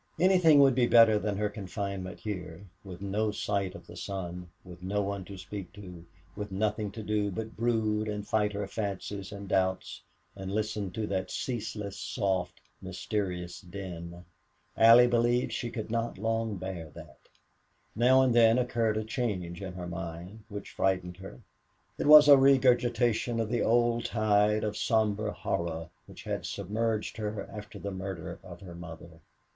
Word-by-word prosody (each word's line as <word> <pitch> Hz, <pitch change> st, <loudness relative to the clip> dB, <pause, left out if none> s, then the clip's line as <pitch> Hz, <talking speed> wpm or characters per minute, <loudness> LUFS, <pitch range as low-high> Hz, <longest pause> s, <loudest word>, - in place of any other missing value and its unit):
Anything 180 Hz, -4 st, +6 dB
would 135 Hz, -1 st, +6 dB
be 125 Hz, -1 st, +3 dB
better 115 Hz, -3 st, +6 dB
than 105 Hz, -1 st, -2 dB
her 105 Hz, 0 st, +1 dB
confinement 100 Hz, -2 st, -5 dB
here, 95 Hz, -3 st, -6 dB, 0.2 s
with 95 Hz, -1 st, -9 dB
no 105 Hz, +2 st, 0 dB
sight 100 Hz, -2 st, -2 dB
of -, -, -11 dB
the -, -, -12 dB
sun, 90 Hz, -3 st, -6 dB, 0.2 s
with 90 Hz, -1 st, -12 dB
no 100 Hz, +3 st, -1 dB
one 100 Hz, -1 st, -3 dB
to 100 Hz, 0 st, -9 dB
speak 95 Hz, +2 st, -7 dB
to, 90 Hz, -4 st, -10 dB, 0.3 s
with 105 Hz, -1 st, -6 dB
nothing 105 Hz, +1 st, -1 dB
to 110 Hz, -, -7 dB
do 105 Hz, -1 st, 0 dB
but 110 Hz, +3 st, -6 dB
brood 110 Hz, -2 st, 0 dB
and 105 Hz, -1 st, -4 dB
fight 105 Hz, -1 st, +1 dB
her 100 Hz, 0 st, -2 dB
fancies 100 Hz, -1 st, -4 dB
and 100 Hz, 0 st, -8 dB
doubts, 95 Hz, -1 st, 0 dB, 0.3 s
and 95 Hz, -1 st, -6 dB
listen 105 Hz, -1 st, -2 dB
to 105 Hz, +4 st, -3 dB
that 95 Hz, -2 st, -2 dB
ceaseless, 105 Hz, -5 st, -4 dB
soft, 95 Hz, -2 st, -2 dB, 0.2 s
mysterious 90 Hz, -1 st, -4 dB
din. 90 Hz, -2 st, -8 dB, 0.5 s
Allie 115 Hz, +2 st, +8 dB
believed 120 Hz, 0 st, +2 dB
she 120 Hz, -, -3 dB
could 110 Hz, -2 st, -6 dB
not 115 Hz, -2 st, -1 dB
long 115 Hz, 0 st, -1 dB
bear 90 Hz, -3 st, -6 dB
that. 75 Hz, -5 st, -12 dB, 0.8 s
Now 130 Hz, +4 st, +5 dB
and 130 Hz, -2 st, +3 dB
then 115 Hz, 0 st, +6 dB
occurred 115 Hz, -3 st, +1 dB
a 110 Hz, -, -1 dB
change 100 Hz, -6 st, -3 dB
in 95 Hz, -2 st, -6 dB
her 90 Hz, -1 st, -6 dB
mind 85 Hz, +4 st, -7 dB
which 100 Hz, -1 st, -7 dB
frightened 90 Hz, -2 st, -1 dB
her. 95 Hz, -10 st, -11 dB, 0.6 s
It -, -, 0 dB
was 150 Hz, 0 st, +10 dB
a 140 Hz, -2 st, +9 dB
regurgitation 120 Hz, -3 st, +3 dB
of 110 Hz, -1 st, -1 dB
the 120 Hz, 0 st, 0 dB
old 120 Hz, 0 st, +2 dB
tide 105 Hz, -1 st, +2 dB
of 105 Hz, -1 st, -2 dB
somber 110 Hz, -1 st, +1 dB
horror 85 Hz, -5 st, -3 dB, 0.2 s
which -, -, -12 dB
had -, -, -3 dB
submerged 110 Hz, +3 st, -2 dB
her 105 Hz, -2 st, -4 dB
after 105 Hz, 0 st, -8 dB
the 100 Hz, -, -5 dB
murder 95 Hz, 0 st, -6 dB
of 85 Hz, -2 st, -11 dB
her 90 Hz, -3 st, -9 dB
mother. 85 Hz, -1 st, -10 dB
105 Hz, 165 wpm, -29 LUFS, 95-115 Hz, 0.8 s, was